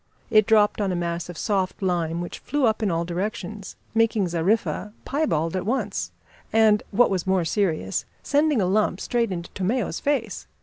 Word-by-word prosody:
It 215 -2 +5
dropped 210 -1 +4
on 195 -2 0
a - - -1
mass 170 0 -3
of 175 - -7
soft 195 -2 -1
lime, 170 -2 0
which 175 - -6
flew 290 -2 0
up 220 0 +1
in 210 - +1
all 170 -1 0
directions, 190 +2 -4 0.2
making 225 -4 +2
Zariffa 200 +4 0
piebald 165 - 0
at 185 - -1
once, 240 +7 -2 0.4
and, 220 -2 +4
what 245 +3 +3
was 190 -1 -1
more 190 -2 +2
serious, 160 - 0 0.2
sending 295 -2 +2
a 190 - +2
lump 195 0 +1
straight 235 -2 0
into 170 -1 -5
Tomeo's 195 -1 -1
face. 255 -8 -1
200 Hz, 175 wpm, -24 LUFS, 175-220 Hz, 0.4 s, It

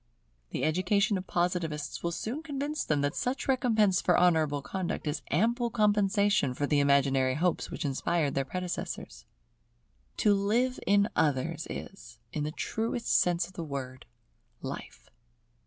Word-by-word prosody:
The - - -3
education 190 +6 +2
of 185 - -9
Positivists 175 -4 -1
will 170 - -1
soon 225 - -4
convince 295 -1 -3
them 150 -2 0
that 145 0 0
such 255 +2 -2
recompense 220 -8 +3
for 180 - +3
honourable 160 -5 +3
conduct 180 +4 -3
is 150 +1 -2
ample 235 - +1
compensation 205 - +2
for 145 - 0
the 145 0 +2
imaginary 135 -2 +3
hopes 175 +2 0
which - - -5
inspired 145 +2 0
their 135 - +1
predecessors. 180 +5 -5 0.9
To 210 -3 +4
live 230 +6 +1
in 200 +1 +4
others 160 +1 0
is, 120 -11 -8 0.2
in 150 -1 -1
the 150 - -2
truest 225 +7 -3
sense 175 0 +3
of 190 - -14
the 170 - -5
word, 130 -4 -6 0.6
life. - - -8
175 Hz, 145 wpm, -29 LUFS, 145-210 Hz, 0.9 s, To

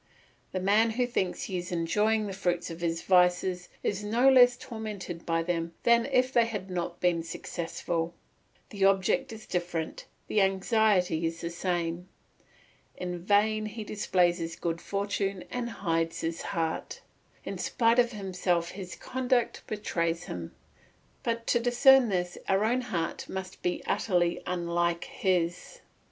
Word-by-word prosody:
The 185 - -2
man 210 +4 +4
who 245 +3 +1
thinks 190 -7 -1
he 185 -3 -2
is 175 +1 -7
enjoying 210 +6 +1
the 200 - -4
fruits 175 -2 -1
of 165 +1 -8
his 165 -1 -1
vices 180 0 +3
is 205 0 -1
no 230 +5 +3
less 245 -2 +7
tormented 215 -8 -7
by 165 0 +1
them 170 -1 -2
than 235 +1 +4
if 255 -1 +2
they 235 -1 +4
had 200 -4 -5
not 175 -1 -3
been 175 -2 +2
successful; 165 0 -4 0.6
the 200 -2 -2
object 195 +7 +3
is 220 -1 -9
different, 175 -2 -3 0.2
the 210 - +2
anxiety 195 -3 +2
is 165 +1 -5
the 170 - -4
same; 175 0 -2 0.9
in 180 -1 -4
vain 215 +2 +2
he 215 +1 -6
displays 180 -4 +1
his 165 0 -4
good 165 -1 -3
fortune 200 -1 -2
and 245 -1 -2
hides 165 -6 -1
his 165 0 -3
heart; 165 -1 -3 0.4
in - - -5
spite 230 +1 +2
of 240 0 +4
himself 180 -4 -1
his 185 -2 -7
conduct 255 -2 0
betrays 170 -5 -1
him; 85 - -6 0.7
but 230 0 -2
to 240 - +3
discern 245 +1 +6
this, 180 -2 -2
our 195 +1 +3
own 245 +3 +2
heart 175 -9 -3
must 190 -1 -6
be 180 - -1
utterly 175 -4 +1
unlike 170 -1 0
his. 175 -3 -1
185 Hz, 150 wpm, -29 LUFS, 170-220 Hz, 0.9 s, less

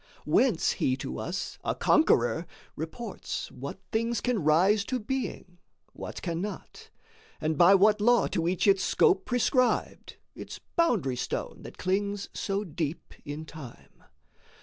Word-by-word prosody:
Whence 235 -11 +3
he 130 0 0
to - - -5
us, 185 +3 -4
a - - -1
conqueror, 160 - +3 0.3
reports 190 +8 -5
What 140 +5 -7
things 230 +1 0
can 240 -8 -1
rise 185 +7 +4
to 255 +1 -2
being, 215 -7 -4 0.3
what - - -8
cannot, 180 +4 -5 0.5
And 155 0 0
by 175 +6 +7
what 210 +2 +4
law 240 0 +4
to 165 -1 -1
each 180 0 0
its 195 -2 +4
scope 190 - +3
prescribed, 250 +1 0 0.2
Its - - -8 0.2
boundary 215 - +2
stone - - -4
that - - -11
clings 200 +2 -1
so 200 +1 -2
deep 160 -3 -4
in 145 +2 -6
Time. 155 -7 -12
195 Hz, 135 wpm, -28 LUFS, 160-220 Hz, 0.5 s, by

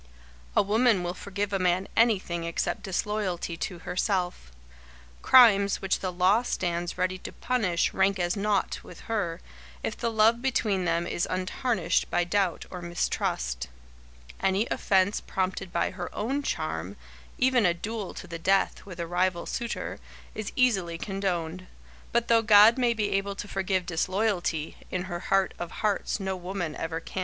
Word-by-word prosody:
A - - +5
woman 215 -1 +3
will 175 0 -2
forgive 200 +2 -4
a 195 - +1
man 185 +1 +1
anything 195 -7 +2
except 170 0 -2
disloyalty 190 -3 -2
to 180 +1 -4
herself. 180 - -1 0.7
Crimes 200 -6 +6
which 195 - 0
the 185 - -2
law 185 +5 +3
stands 175 -7 -2
ready 185 0 -1
to - - -7
punish 205 -9 0
rank 195 0 +2
as 175 -1 0
naught 205 -1 0
with 175 - -12
her, 195 -7 -2 0.4
if - - -2
the 235 - -1
love 225 +1 +4
between 215 -8 +1
them 170 0 +1
is 175 - -1
untarnished 185 -1 0
by 175 - +2
doubt 180 -1 0
or 180 - -6
mistrust. 65 - -2 0.7
Any 195 +3 +2
offence 190 +1 +2
prompted 190 0 -3
by 170 - 0
her 180 -1 -5
own 265 +7 -1
charm, - - -3 0.4
even 255 -2 +3
a 175 -3 +3
duel 210 +2 -5
to - - -7
the 170 -2 -7
death 195 +3 +1
with 180 -3 -9
a 170 - -2
rival 175 +1 0
suitor, 235 -2 -4 0.3
is 215 -1 -5
easily 195 -10 +2
condoned. 185 -2 -3 0.4
But 235 0 +1
though 230 -1 +5
God 215 +1 +7
may 240 -2 +2
be 210 -2 -1
able 195 0 -1
to 205 - -6
forgive 190 -2 -1
disloyalty, 180 -2 -1
in 180 -1 -2
her 175 -2 -5
heart 195 +1 +1
of 175 - -4
hearts 210 +2 -1
no 190 -1 -2
woman 180 -3 -4
ever 165 0 -3
can. 175 - -6
190 Hz, 160 wpm, -27 LUFS, 175-210 Hz, 0.7 s, God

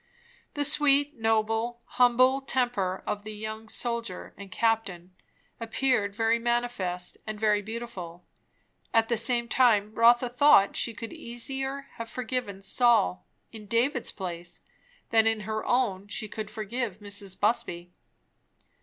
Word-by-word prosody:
The 290 0 0
sweet, 290 -1 +3
noble, 225 +2 0
humble 255 +2 +3
temper 240 -9 -1
of 205 0 -3
the 215 0 -7
young 220 +1 -7
soldier 235 -6 -3
and 200 -1 -11
captain, 200 -6 -1 0.5
appeared 225 -3 0
very 225 +1 +2
manifest 235 -7 -2
and 215 -1 -5
very 210 -1 +2
beautiful; 205 -6 -7 0.7
at 225 0 +3
the 235 - +2
same 235 +1 +1
time, 220 -4 +3
Rotha 240 +2 +4
thought 245 -5 +5
she 235 - -1
could 230 +1 -7
easier 270 +3 -3
have 230 0 -6
forgiven 240 -5 -4
Saul, 190 - +2 0.2
in 215 -2 -11
David's 240 +3 +1
place, 175 -3 -6 0.5
than 225 -1 +5
in 225 -1 +1
her 215 +1 -3
own 205 -6 0
she 215 +1 -4
could 215 0 -6
forgive 220 -1 -4
Mrs. 200 -2 -3
Busby. 175 -5 0
225 Hz, 130 wpm, -27 LUFS, 205-240 Hz, 0.7 s, thought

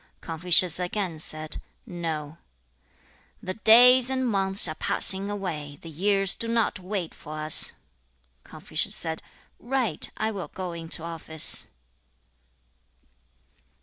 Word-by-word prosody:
Confucius 170 +1 +2
again 180 -2 -4
said, 155 0 -2 0.2
'No.' 165 -5 -6 1.0
'The 185 - -5
days 245 +4 +5
and 260 -1 -2
months 195 -3 +3
are 155 - -4
passing 190 +5 +3
away; 160 -8 -6
the 165 - -10
years 195 +4 +2
do 230 - -1
not 230 -3 -1
wait 185 -2 -5
for 155 +1 -11
us.' 155 0 +4 0.7
Confucius - - -2
said, 160 -1 -4 0.4
'Right; 240 - -1
I 220 - -2
will 195 -4 -7
go 185 -2 -7
into 165 -1 0
office.' 160 -2 -3
180 Hz, 115 wpm, -24 LUFS, 160-205 Hz, 1.0 s, days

